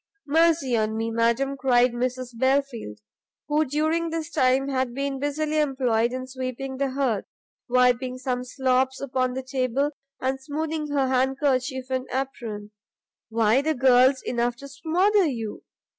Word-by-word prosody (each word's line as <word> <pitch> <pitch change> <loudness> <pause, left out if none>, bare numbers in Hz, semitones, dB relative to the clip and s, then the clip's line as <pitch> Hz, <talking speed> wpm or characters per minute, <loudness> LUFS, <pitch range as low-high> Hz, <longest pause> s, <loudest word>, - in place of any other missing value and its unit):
"Mercy 315 -4 +3
on 220 0 0
me, 225 0 -2
madam," 235 +4 +1
cried 250 -2 +3
Mrs 255 +1 -2
Belfield, 260 - 0 0.5
who 300 +1 +2
during 315 +4 0
this 325 0 -4
time 260 0 +2
had 260 -3 -1
been 275 0 -2
busily 305 +2 -1
employed 250 -5 +1
in 255 0 -4
sweeping 260 +1 -5
the 275 0 0
hearth, 260 -6 -1 0.4
wiping 250 0 +2
some 255 -1 -2
slops 260 0 0
upon 255 -2 -1
the 265 - -3
table, 260 +2 0 0.3
and 265 +1 -2
smoothing 310 +2 -3
her 280 -2 +1
handkerchief 260 0 0
and 260 0 -1
apron, 230 -6 -4 0.6
"why 225 +3 +3
the 315 +2 0
girl's 260 +1 +4
enough 240 0 -1
to 280 +3 -10
smother 350 +8 +2
you. 225 -6 -4
260 Hz, 145 wpm, -25 LUFS, 250-280 Hz, 0.6 s, girl's